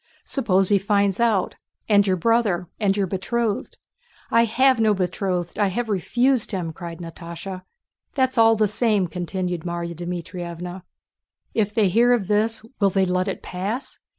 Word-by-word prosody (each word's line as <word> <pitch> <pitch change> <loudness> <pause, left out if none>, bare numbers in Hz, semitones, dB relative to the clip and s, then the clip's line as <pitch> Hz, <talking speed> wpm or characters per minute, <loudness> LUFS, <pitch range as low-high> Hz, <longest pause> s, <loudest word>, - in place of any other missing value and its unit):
"Suppose 195 -8 +2
he 200 -1 +4
finds 200 0 +1
out, 225 -6 +1 0.3
and 205 -2 +4
your 190 - +3
brother, 205 -3 +1
and 200 -2 +1
your 200 - +2
betrothed?" 205 +4 -2 0.5
"I 230 0 +5
have 255 +2 +3
no 215 -2 +3
betrothed: 180 -1 -2
I 205 - +3
have 225 +5 -2
refused 240 +6 +1
him!" 170 -4 -3
cried 170 -1 -7
Natásha. 170 +2 -8 0.5
"That's 260 -1 +1
all 225 0 +6
the 215 -1 +2
same," 210 -2 +1
continued 180 0 -3
Márya 170 0 -4
Dmítrievna. 175 +1 -6 0.7
"If 210 -2 +1
they 215 -4 +4
hear 235 +6 +4
of 230 -5 +1
this, 220 +2 +1
will 200 -2 +4
they 190 0 +2
let 185 +1 0
it 195 - -4
pass? 200 +9 -4
195 Hz, 155 wpm, -23 LUFS, 180-225 Hz, 0.7 s, all